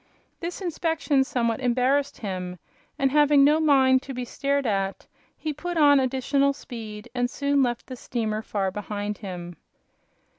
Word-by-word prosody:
This 345 +3 -5
inspection 325 -5 +1
somewhat 235 -4 -1
embarrassed 260 +3 +1
him, 180 -3 -4 0.4
and 270 -1 +2
having 295 -1 +5
no 300 +3 +5
mind 265 -4 +4
to 270 -1 -8
be 250 0 -3
stared 280 +2 -1
at 195 -3 -1 0.3
he 310 -1 -3
put 345 +4 -4
on 290 -2 +6
additional 270 +2 +1
speed 220 -5 -8
and 245 -1 0
soon 280 +1 +1
left 240 -2 0
the 255 - -7
steamer 220 -3 -3
far 195 -3 -2
behind 210 +1 -4
him. 175 -4 -7
260 Hz, 150 wpm, -25 LUFS, 215-285 Hz, 0.4 s, on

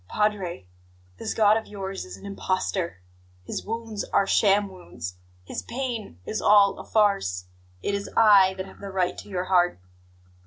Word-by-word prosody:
"Padre, 200 - -1 0.5
this - - -3
God 215 0 +5
of 225 - -5
yours 195 -1 -5
is 90 +1 -9
an - - -13
impostor, 185 - -2 0.4
His - - -5
wounds 225 -1 -4
are 200 - +2
sham 200 +1 +3
wounds, 90 - -8 0.3
His - - -5
pain 235 - -5
is 215 - -3
all 205 -1 +5
a - - -7
farce! 195 - +1 0.4
It - - 0
is 200 0 -3
I 200 -4 +7
that 190 0 -5
have 190 - -14
the 200 - -7
right 185 -2 0
to - - -11
your 180 -2 -2
heart! 175 - +2
195 Hz, 165 wpm, -26 LUFS, 180-210 Hz, 0.5 s, I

